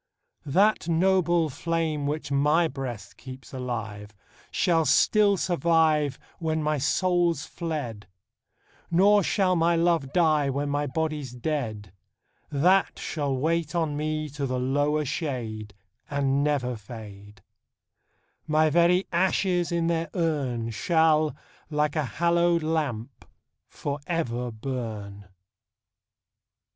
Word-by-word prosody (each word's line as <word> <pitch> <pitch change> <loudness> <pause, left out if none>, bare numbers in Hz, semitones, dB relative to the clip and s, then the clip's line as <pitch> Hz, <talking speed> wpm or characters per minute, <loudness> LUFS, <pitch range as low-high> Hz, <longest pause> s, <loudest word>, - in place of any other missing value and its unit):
That 195 +5 +3
noble 175 -1 +3
flame, 160 -1 -2
which 150 0 -3
my 150 +4 +3
Ijreast 125 -8 -7
keeps 130 +2 -11
alive. 110 -5 -5 0.3
Shall 165 -3 +2
still 200 +7 +4
survive 160 -5 +2 0.2
Wlien 160 -1 0
my 150 -1 0
soul's 175 0 +1
fled; 145 - -5 0.8
Nor 200 +4 +5
shall 185 0 +1
my 170 0 +3
love 165 -5 +1
die, 155 -5 +3
when 140 +1 -2
ray 145 0 0
Ijody's 150 -2 -3
dead; 115 - -4 0.6
That 180 +7 +3
shall 145 -4 -2
wait 165 +3 -1
on 160 -3 0
me 155 +1 -2
to 140 0 -4
the 130 0 -2
lower 145 +4 +1
shade, 115 - -4 0.3
And 140 -1 +1
never 135 -4 0
fade: 105 -2 -11 1.0
My 155 0 +3
very 175 +3 +4
ashes 180 0 +1
in 170 -1 0
their 165 -1 0
urn 135 -9 -1
Shall, 155 +4 +2 0.3
like 150 -1 0
a 155 -2 0
hallowed 170 0 +2
lamp, 140 -7 -2 0.4
for 145 0 -5
ever 125 -8 -2
burn. 110 -4 -6
150 Hz, 110 wpm, -26 LUFS, 130-165 Hz, 1.0 s, Nor